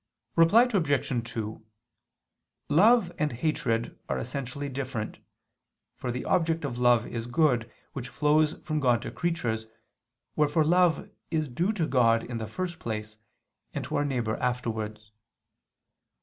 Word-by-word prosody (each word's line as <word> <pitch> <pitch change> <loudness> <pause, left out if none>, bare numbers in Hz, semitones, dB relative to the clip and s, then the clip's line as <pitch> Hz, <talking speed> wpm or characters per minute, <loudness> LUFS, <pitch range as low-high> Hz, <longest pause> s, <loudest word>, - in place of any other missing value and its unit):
Reply 165 +8 +6
Obj. 145 - 0
2: 110 -1 -5 1.1
Love 200 +5 +5
and 150 -3 0
hatred 115 -3 -1
are - - 0
essentially 135 +2 -4
different, 130 -5 -4 0.8
for 125 - -4
the 125 - -4
object 165 -1 +1
of 120 - -4
love 120 -2 +4
is 115 0 -5
good, 120 -4 +2 0.2
which 125 -2 -5
flows 150 +2 +3
from 155 -2 -1
God 125 -4 +2
to - - -5
creatures, 120 -11 -2 0.7
wherefore 150 +1 +3
love 175 0 +3 0.2
is 155 -2 0
due 170 - 0
to 175 -7 0
God 115 -5 +3
in 120 -1 -5
the 110 - -4
first 175 - -4
place, 110 -1 -5 0.6
and - - -2
to - - -4
our 145 - +2
neighbor 120 -6 -1
afterwards. 110 -4 -3
130 Hz, 135 wpm, -28 LUFS, 115-160 Hz, 1.1 s, Reply